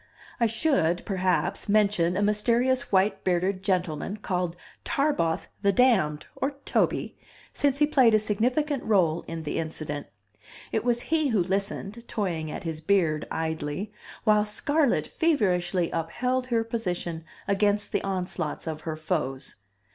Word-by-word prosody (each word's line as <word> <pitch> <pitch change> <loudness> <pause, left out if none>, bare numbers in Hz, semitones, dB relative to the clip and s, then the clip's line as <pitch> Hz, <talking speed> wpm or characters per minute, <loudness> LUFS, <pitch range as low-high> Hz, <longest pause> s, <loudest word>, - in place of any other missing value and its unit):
I 235 - +4
should, 220 - +1
perhaps, 185 +1 0
mention 200 -4 +3
a 205 - +1
mysterious 235 +5 +2
white 195 +1 +2
bearded 185 +1 +1
gentleman 185 0 -1
called 180 -4 -2 0.3
Tarboth 275 - 0
the 200 -1 +4
damned, 195 -11 +3
or 275 +1 -2
Toby, - - 0 0.4
since 280 -1 +1
he 295 - +5
played 260 -7 +5
a - - +7
significant 250 +7 0
role 175 -6 +2
in 165 -1 -5
the 150 - -2
incident. 155 -2 -4 0.6
It 220 - 0
was 240 0 +1
he 315 0 +1
who 220 -8 +2
listened, 200 +4 -3
toying 170 -7 -2
at - - -6
his 160 -2 -4
beard 160 -4 +1
idly, 160 +5 -3 0.3
while 210 -2 +4
Scarlett 235 - +1
feverishly 185 - +1
upheld 250 +10 -1
her 230 -2 +1
position 180 -8 -3 0.2
against 205 +1 +1
the - - 0
onslaughts 180 -4 -2
of 155 -1 -4
her 160 -1 -4
foes. 155 -5 -3
195 Hz, 140 wpm, -27 LUFS, 165-230 Hz, 0.6 s, a